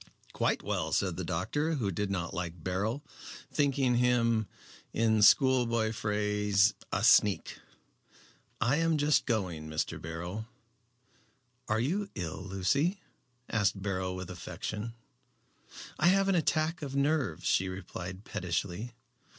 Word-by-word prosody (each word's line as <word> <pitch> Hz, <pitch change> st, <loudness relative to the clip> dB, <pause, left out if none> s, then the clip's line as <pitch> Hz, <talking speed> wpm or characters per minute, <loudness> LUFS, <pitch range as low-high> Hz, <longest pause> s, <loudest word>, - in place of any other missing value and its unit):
"Quite -, -, 0 dB
well," -, -, -2 dB
said -, -, +1 dB
the -, -, -4 dB
doctor, 145 Hz, -, -1 dB
who 110 Hz, -9 st, -1 dB
did 100 Hz, +3 st, -2 dB
not 85 Hz, -3 st, -2 dB
like 85 Hz, -2 st, -5 dB
Beryl, 105 Hz, +9 st, -1 dB, 0.5 s
thinking 135 Hz, -4 st, +2 dB
him, 115 Hz, -3 st, +2 dB, 0.5 s
in 110 Hz, -1 st, +2 dB
schoolboy 115 Hz, -2 st, +4 dB
phrase, 105 Hz, -1 st, +2 dB, 0.2 s
"a -, -, 0 dB
sneak." 105 Hz, -2 st, +4 dB, 1.0 s
"I 120 Hz, +6 st, +2 dB
am 165 Hz, -1 st, +2 dB
just 150 Hz, 0 st, +2 dB
going, 90 Hz, -, -2 dB
Mr. 80 Hz, -, -2 dB
Beryl." 85 Hz, +7 st, -5 dB, 1.2 s
"Are 110 Hz, +1 st, +2 dB
you 190 Hz, -, -1 dB
ill, 85 Hz, -2 st, -4 dB
Lucy?" 135 Hz, -, 0 dB, 0.5 s
asked 105 Hz, -3 st, +1 dB
Beryl, 95 Hz, -2 st, -2 dB
with 90 Hz, 0 st, -6 dB
affection. 105 Hz, +5 st, -5 dB, 1.0 s
"I 175 Hz, -, +4 dB
have 195 Hz, +2 st, +4 dB
an 195 Hz, -, +3 dB
attack 160 Hz, -1 st, +1 dB
of 140 Hz, -2 st, -5 dB
nerves," 140 Hz, -, 0 dB
she 95 Hz, 0 st, +2 dB
replied 95 Hz, +1 st, -7 dB
pettishly. 90 Hz, +6 st, -3 dB
110 Hz, 125 wpm, -30 LUFS, 95-135 Hz, 1.2 s, schoolboy